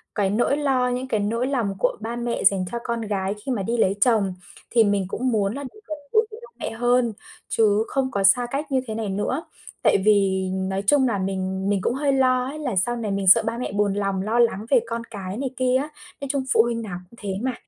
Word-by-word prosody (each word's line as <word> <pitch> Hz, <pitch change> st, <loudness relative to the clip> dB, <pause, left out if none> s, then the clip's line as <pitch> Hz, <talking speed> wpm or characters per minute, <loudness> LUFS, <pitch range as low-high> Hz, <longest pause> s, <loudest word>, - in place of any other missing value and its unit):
cái 200 Hz, -2 st, +1 dB
nỗi 240 Hz, +7 st, +1 dB
lo 265 Hz, -4 st, +1 dB
những 250 Hz, +1 st, -3 dB
cái 220 Hz, -4 st, 0 dB
nỗi 230 Hz, +5 st, -1 dB
lòng 235 Hz, -8 st, -1 dB
của -, -, +1 dB
ba 230 Hz, +2 st, -4 dB
mẹ 240 Hz, 0 st, -2 dB
dành 195 Hz, -1 st, +4 dB
cho 235 Hz, -, -2 dB
con 235 Hz, -1 st, -2 dB
gái 200 Hz, -3 st, -2 dB
khi 270 Hz, -, -2 dB
mà 215 Hz, -6 st, -1 dB
đi 235 Hz, +5 st, -1 dB
lấy 195 Hz, -3 st, +2 dB
chồng 210 Hz, -5 st, +3 dB, 0.4 s
thì 235 Hz, -2 st, +4 dB
mình 200 Hz, -2 st, +1 dB
cũng 250 Hz, +6 st, -1 dB
muốn 205 Hz, -2 st, +1 dB
là 280 Hz, +2 st, -5 dB
được 280 Hz, +11 st, -10 dB
gần 310 Hz, -, -4 dB
gũi 440 Hz, +1 st, +4 dB
với 435 Hz, -, -9 dB
ba -, -, -10 dB, 0.2 s
mẹ -, -, -3 dB
hơn, 240 Hz, 0 st, +1 dB, 0.3 s
chứ 215 Hz, -1 st, +3 dB
không 265 Hz, -1 st, -1 dB
có 200 Hz, -, -1 dB
xa 240 Hz, +5 st, +5 dB
cách 290 Hz, +2 st, -3 dB
như 260 Hz, -1 st, +2 dB
thế 220 Hz, -, -4 dB
này 220 Hz, -2 st, -3 dB
nữa. 205 Hz, +10 st, -2 dB, 0.4 s
Tại -, -, +5 dB
vì 195 Hz, -3 st, +3 dB
nói 190 Hz, +1 st, -2 dB
chung 275 Hz, 0 st, +4 dB
là 225 Hz, -4 st, 0 dB
mình 190 Hz, 0 st, -2 dB
mình 200 Hz, -2 st, +1 dB
cũng 235 Hz, -, 0 dB
hơi 280 Hz, +2 st, +1 dB
lo 255 Hz, -1 st, +3 dB
ấy 285 Hz, +4 st, -6 dB
là 260 Hz, -8 st, -2 dB
sau 215 Hz, +6 st, +1 dB
này 225 Hz, -4 st, -3 dB
mình 195 Hz, -1 st, -2 dB
sợ 185 Hz, -, +8 dB
ba 225 Hz, +1 st, -2 dB
mẹ 250 Hz, -, -3 dB
buồn 205 Hz, 0 st, +1 dB
lòng 195 Hz, -1 st, -1 dB
lo 220 Hz, +4 st, 0 dB
lắng 225 Hz, -3 st, +2 dB
về 265 Hz, -, +5 dB
con 230 Hz, 0 st, -3 dB
cái 200 Hz, -3 st, -7 dB
này 265 Hz, +1 st, -2 dB
kia 255 Hz, 0 st, +2 dB
á, 280 Hz, +3 st, 0 dB, 0.3 s
nói 280 Hz, -, -4 dB
chung 275 Hz, -2 st, -1 dB
phụ -, -, +6 dB
huynh 235 Hz, -1 st, -2 dB
nào 195 Hz, -6 st, -5 dB
cũng 235 Hz, -, -18 dB
thế 200 Hz, -2 st, -3 dB
mà. 260 Hz, +1 st, -1 dB
230 Hz, 260 wpm, -23 LUFS, 200-255 Hz, 0.4 s, sợ